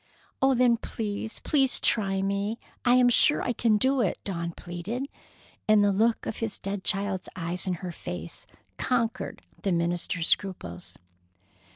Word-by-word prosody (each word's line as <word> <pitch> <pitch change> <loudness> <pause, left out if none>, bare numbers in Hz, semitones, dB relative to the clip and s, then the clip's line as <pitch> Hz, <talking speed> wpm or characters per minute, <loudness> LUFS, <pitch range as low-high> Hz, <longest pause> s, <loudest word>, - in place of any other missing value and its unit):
"Oh, 270 0 +4
then, 245 -1 +4
please, 220 -1 -5
please, 270 -3 +3
try 195 -3 +1
me! 200 +3 -1 0.3
I 245 0 +5
am 250 -1 +5
sure 255 +4 +5
I 245 - 0
can 225 -3 +2
do 260 +4 +2
it," 200 - 0
Dawn 170 -3 -3
pleaded, 175 +10 -5 0.6
and 215 -1 +5
the 205 - +4
look 220 +4 +1
of - - -4
his 225 -2 -1
dead 195 0 -5
child's 195 -2 -1
eyes 180 +2 -3
in 180 - 0
her 180 - -3
face - - -6 0.3
conquered 235 -3 -1 0.2
the 195 - 0
minister's 170 0 0
scruples. 90 - 0
205 Hz, 155 wpm, -27 LUFS, 180-235 Hz, 0.6 s, I